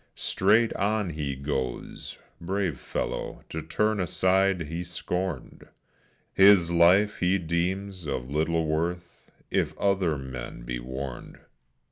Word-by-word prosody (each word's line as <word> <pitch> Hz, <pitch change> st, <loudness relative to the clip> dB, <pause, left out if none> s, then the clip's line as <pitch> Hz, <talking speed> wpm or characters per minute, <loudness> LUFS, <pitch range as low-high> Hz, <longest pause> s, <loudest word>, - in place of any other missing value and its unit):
Straight 110 Hz, +4 st, +2 dB
on 105 Hz, -3 st, 0 dB
he 75 Hz, -3 st, -3 dB
goes, 65 Hz, -3 st, -4 dB, 0.2 s
brave 95 Hz, -4 st, -1 dB
fellow; -, -, -4 dB
to 80 Hz, -, -4 dB
turn 105 Hz, +7 st, 0 dB
aside 95 Hz, +1 st, +2 dB
he 80 Hz, +3 st, -4 dB
scorned, 90 Hz, +1 st, -4 dB, 0.7 s
His 95 Hz, -3 st, +6 dB
life 90 Hz, +5 st, +4 dB
he 90 Hz, +2 st, +3 dB
deems 90 Hz, +1 st, -2 dB
of 65 Hz, -3 st, -3 dB
little 80 Hz, +2 st, +1 dB
worth 85 Hz, +3 st, -3 dB, 0.2 s
if -, -, 0 dB
other 95 Hz, -6 st, +1 dB
men 65 Hz, -3 st, -7 dB
be -, -, -4 dB
warned. 65 Hz, +1 st, -6 dB
85 Hz, 115 wpm, -27 LUFS, 75-95 Hz, 0.7 s, His